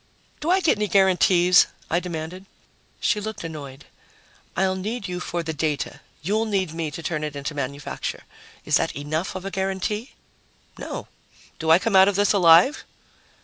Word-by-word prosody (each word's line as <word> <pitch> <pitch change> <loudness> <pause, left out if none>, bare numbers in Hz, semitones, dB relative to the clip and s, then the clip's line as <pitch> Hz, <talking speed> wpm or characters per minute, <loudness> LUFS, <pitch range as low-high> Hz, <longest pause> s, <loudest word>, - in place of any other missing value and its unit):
"Do 305 - -3
I 375 +2 +4
get 305 - +2
any 210 - +1
guarantees?" 180 -2 +5 0.2
I 175 - +1
demanded. 180 +2 -6 0.5
She 210 -2 +1
looked 215 -2 -6
annoyed. 150 -4 -8 0.7
"I'll 190 0 +2
need 205 +3 -4
you 180 0 -4
for 175 -1 -3
the 160 0 -3
data. 150 -2 -2 0.2
You'll 215 +6 +1
need 190 -6 -1
me 165 -1 -3
to 165 +3 -8
turn 155 -2 -2
it 150 -1 -4
into 140 +2 -4
manufacture. 140 0 -4 0.4
Is - - +3
that - - -1
enough 155 +7 -3
of 185 0 -6
a 195 - -4
guarantee?" 195 +5 -2 0.7
"No. - - -6 0.5
Do 160 -1 -2
I 160 - +8
come 225 +1 -1
out 190 0 +8
of 200 - +1
this 205 +1 +3
alive?" 180 - +6
180 Hz, 170 wpm, -24 LUFS, 160-200 Hz, 0.7 s, I